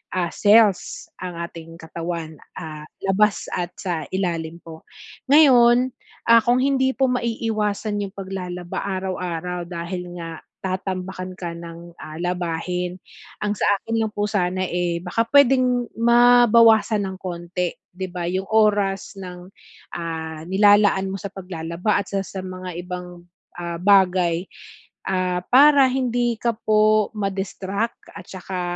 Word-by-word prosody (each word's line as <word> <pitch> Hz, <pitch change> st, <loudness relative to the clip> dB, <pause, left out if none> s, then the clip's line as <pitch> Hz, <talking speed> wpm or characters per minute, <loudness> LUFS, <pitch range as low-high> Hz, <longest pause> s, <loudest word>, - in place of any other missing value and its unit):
ah, 175 Hz, -2 st, 0 dB
cells 210 Hz, -2 st, +3 dB
ang 180 Hz, -1 st, -6 dB
ating 165 Hz, -1 st, -11 dB
katawan, 165 Hz, -1 st, -6 dB, 0.2 s
ah, 155 Hz, -3 st, -7 dB, 0.2 s
labas 200 Hz, +2 st, +2 dB
at 175 Hz, 0 st, -3 dB
sa 175 Hz, -5 st, -3 dB
ilalim 170 Hz, -3 st, -2 dB
po. 160 Hz, -1 st, -11 dB, 0.5 s
Ngayon, 255 Hz, -4 st, +6 dB, 0.4 s
ah, 230 Hz, -, +9 dB
kung 245 Hz, +1 st, +3 dB
hindi 265 Hz, -1 st, +2 dB
po 265 Hz, 0 st, +2 dB
maiiwasan 220 Hz, -3 st, -1 dB
'yong 195 Hz, -, -16 dB
paglalaba 180 Hz, -2 st, -5 dB, 0.2 s
araw-araw 180 Hz, -2 st, -4 dB
dahil 175 Hz, +1 st, -5 dB
nga 165 Hz, -1 st, -6 dB, 0.3 s
tatambakan 185 Hz, 0 st, -4 dB
ka 170 Hz, -3 st, -5 dB
ng, 170 Hz, 0 st, -10 dB
ah, 155 Hz, 0 st, -8 dB
labahin, 180 Hz, 0 st, -2 dB, 0.4 s
ang 210 Hz, -1 st, 0 dB
sa 210 Hz, -, -1 dB, 0.2 s
akin 225 Hz, 0 st, -1 dB
lang 220 Hz, -, 0 dB
po 205 Hz, 0 st, -1 dB
sana, 185 Hz, -2 st, 0 dB
eh, 175 Hz, -1 st, -1 dB
baka 180 Hz, +5 st, -1 dB
puwedeng 255 Hz, -3 st, +4 dB
mabawasan 230 Hz, -3 st, +5 dB
ng 190 Hz, 0 st, -6 dB
konti. 175 Hz, 0 st, -3 dB, 0.2 s
'Di 185 Hz, +1 st, -5 dB
ba, 175 Hz, -1 st, -4 dB
yung 190 Hz, +2 st, -2 dB
oras 205 Hz, -3 st, +2 dB
ng, 180 Hz, -2 st, -9 dB, 0.5 s
ah, 160 Hz, -2 st, -5 dB
nilalaan 205 Hz, 0 st, +4 dB
mo -, -, -3 dB
sa 200 Hz, -, -5 dB
paglalaba 180 Hz, +2 st, -2 dB
at -, -, -10 dB
sa 195 Hz, -1 st, 0 dB
sa 190 Hz, -, -6 dB
mga 185 Hz, -1 st, -7 dB
ibang, 180 Hz, -1 st, -8 dB, 0.3 s
ah, 170 Hz, -1 st, -4 dB
bagay, 180 Hz, -2 st, +3 dB, 0.6 s
ah, 185 Hz, -1 st, 0 dB
para 280 Hz, +1 st, +7 dB
hindi 245 Hz, -2 st, 0 dB
ka 235 Hz, -, +1 dB, 0.2 s
po 215 Hz, 0 st, +4 dB
ma-distract 195 Hz, +2 st, -3 dB
at -, -, -10 dB
saka, 185 Hz, 0 st, -6 dB
190 Hz, 135 wpm, -22 LUFS, 175-215 Hz, 0.6 s, ah